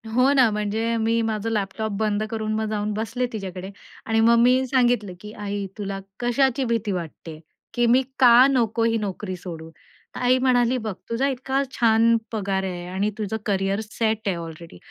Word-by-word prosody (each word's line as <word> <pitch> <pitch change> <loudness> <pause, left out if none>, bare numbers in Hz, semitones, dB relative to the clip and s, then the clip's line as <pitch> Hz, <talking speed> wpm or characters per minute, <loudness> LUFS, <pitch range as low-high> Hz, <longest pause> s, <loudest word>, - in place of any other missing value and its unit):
हो 255 +3 +4
ना, 255 -5 +5
म्हणजे 215 +2 -1
मी 230 +1 +1
माझं 220 0 -2
लॅपटॉप 215 0 -2
बंद 215 -1 0
करून 215 -1 -2
मग 220 0 -1
जाऊन 210 0 -2
बसले 225 +4 -2
तिच्याकडे 190 -2 -6 0.4
आणि 225 0 +1
मग 235 +1 +5
मी 255 +2 +4
सांगितलं 240 -7 +1
की 210 0 -9
"आई 205 -1 -4
तुला 195 -1 -4 0.2
कशाची 260 +2 +1
भीती 230 -3 -1
वाटते? 165 -2 -6 0.3
की 240 0 +2
मी 250 +3 +5 0.2
का 245 0 +8
नको 235 -3 +1
ही 230 0 +2
नोकरी 200 -2 -4
सोडू?" 165 -3 -8 0.5
तर - - -5
आई 255 +1 +4
म्हणाली, 255 -1 +2
"बघ 220 -3 -4 0.2
तुझा 250 +4 0
इतका 265 +1 -1
छान 230 -1 +4 0.2
पगार 195 -3 -1
आहे 175 -2 -4
आणि 195 +3 -1
तुझं 220 +1 -3
कॅरियर 195 -1 0
सेट 220 -2 -1
आहे 185 - +1
अलरेडी 165 - -9
220 Hz, 175 wpm, -23 LUFS, 200-240 Hz, 0.5 s, का